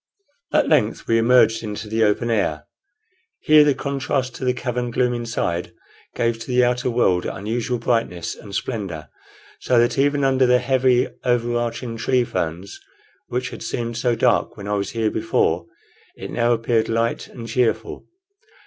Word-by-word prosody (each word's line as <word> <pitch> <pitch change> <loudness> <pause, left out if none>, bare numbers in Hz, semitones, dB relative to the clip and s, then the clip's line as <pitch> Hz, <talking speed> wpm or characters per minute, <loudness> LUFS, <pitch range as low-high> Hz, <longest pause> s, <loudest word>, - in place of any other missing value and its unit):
At - - +3
length - - +1
we 115 0 +3
emerged 115 -1 +4
into 105 0 -6
the 110 +1 +1
open 110 +3 +1
air. 80 -8 0 0.8
Here 155 0 +6
the 145 -2 +2
contrast 135 -2 -2
to - - -8
the 125 - +2
cavern 125 -1 -3
gloom 125 +1 +1
inside 115 -7 -3 0.4
gave 115 -1 0
to - - -8
the 125 -1 +3
outer 125 +1 +1
world 95 -7 +1
unusual 115 +5 -2
brightness 115 -8 -1
and 100 -2 -10
splendor, 95 -10 -4 0.5
so 125 - +1
that 120 +3 +2
even 145 0 +2
under 130 -1 +3
the 125 0 +5
heavy 130 0 +2 0.2
overarching 120 -1 -1
tree 125 +2 +1
ferns, 90 -3 -4 0.5
which 125 +1 -3
had - - -9
seemed 120 -1 -3
so 120 0 +1
dark 120 0 +1
when 100 -1 -7
I 105 - -1
was 100 -1 -1
here 115 -2 0
before, 90 -6 0 0.5
it - - -8
now 120 0 +1
appeared 115 -1 +1
light 115 +1 -1
and 115 -2 -9
cheerful. 115 -1 -1
120 Hz, 160 wpm, -21 LUFS, 110-125 Hz, 0.8 s, Here